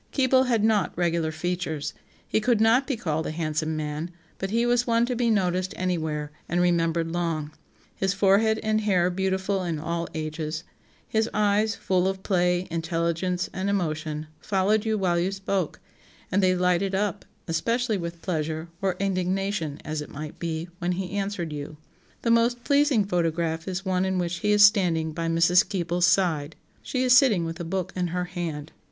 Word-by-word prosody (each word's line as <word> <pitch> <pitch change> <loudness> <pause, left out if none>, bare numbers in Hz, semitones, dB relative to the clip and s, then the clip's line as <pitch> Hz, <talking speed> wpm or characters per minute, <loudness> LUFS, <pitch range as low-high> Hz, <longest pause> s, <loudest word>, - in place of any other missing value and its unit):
Keble 260 -1 +3
had 230 -4 +2
not 210 -7 +2
regular 170 -2 +1
features; 160 -2 -3 0.3
he - - +1
could 235 0 +2
not 230 +5 +4
be 270 -5 -1
called 160 -4 -2
a - - -2
handsome 155 0 -2
man, 150 +2 -3 0.3
but 195 - -2
he 230 +3 +1
was 245 0 +2
one 230 0 +3
to 250 0 -2
be 235 0 +1
noticed 185 -3 0
anywhere, 160 -5 -2 0.2
and 175 - +1
remembered 165 -2 +1
long; 165 -3 -2 0.4
his 190 0 0
forehead 200 +3 +3
and 215 0 +1
hair 185 -4 +2
beautiful 190 +1 -1
in 170 -3 -2
all 170 +2 -3
ages; 155 +1 -4 0.4
his 220 +1 +1
eyes, 210 +1 +2
full 185 -1 +1
of 190 0 -3
play, 180 -1 +1
intelligence, 170 +2 -1
and 190 +1 -2
emotion, 155 -5 -2
followed 205 +2 +1
you 220 -1 +1
while 180 -3 +1
you 180 +3 0
spoke; 195 -3 -2 0.5
and 200 - +3
they 185 -1 +3
lighted 180 +2 +1
up, 205 +1 -1 0.2
especially 225 +6 0
with 170 -1 -6
pleasure, 160 -1 -2
or 190 -2 0
indignation, 190 -4 -1
as 155 0 -3
it 150 - -8
might 150 +1 -8
be, 165 0 -3
when 175 +1 0
he 180 0 -4
answered 195 -5 -3
you. 150 +1 -6 0.5
The 230 - +2
most 235 +1 +2
pleasing 280 -7 +3
photograph 165 -2 -1
is 190 +1 -3
one 185 0 +1
in 190 0 0
which 175 -1 -1
he 210 +2 0
is 210 0 +8
standing 175 -7 +2
by 165 +1 -3
Mrs. 165 +3 +4
Keble's 175 -2 +1
side; 165 -5 +1 0.3
she 255 -1 -2
is 250 -1 +6
sitting 225 -11 +5
with 165 +2 -5
a - - -3
book 185 +1 -3
in 180 -1 0
her 180 +1 -2
hand. 160 -4 -5
180 Hz, 180 wpm, -26 LUFS, 165-205 Hz, 0.5 s, is